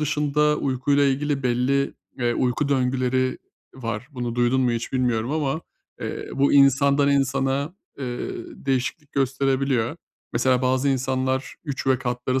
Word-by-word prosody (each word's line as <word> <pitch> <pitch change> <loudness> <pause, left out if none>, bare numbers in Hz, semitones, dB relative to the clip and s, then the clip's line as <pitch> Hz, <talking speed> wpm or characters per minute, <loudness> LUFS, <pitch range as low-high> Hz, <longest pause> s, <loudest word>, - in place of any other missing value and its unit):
dışında 150 0 +2
uykuyla 140 +2 +1
ilgili 140 +1 0
belli, 130 +3 +1 0.2
eee, 120 -1 +1
uyku 130 +3 0
döngüleri 130 -1 +1 0.4
var, 115 -1 -5
bunu 120 -4 -4
duydun 120 +2 +2
mu 125 -2 +2
hiç 115 0 -3
bilmiyorum 125 -2 0
ama, 150 0 -1 0.4
eee, - - -5
bu 140 +1 +3
insandan 140 +1 +5
insana, 135 +3 +1 0.2
eee, 125 -3 -4 0.3
değişiklik 135 - -2
gösterebiliyor. 135 -1 +1 0.4
Mesela, 125 +1 +2
bazı 130 +2 +2
insanlar 130 0 0
3 140 -4 -4
ve 130 -1 +3
katları 125 +1 -1
130 Hz, 130 wpm, -24 LUFS, 125-140 Hz, 0.4 s, insandan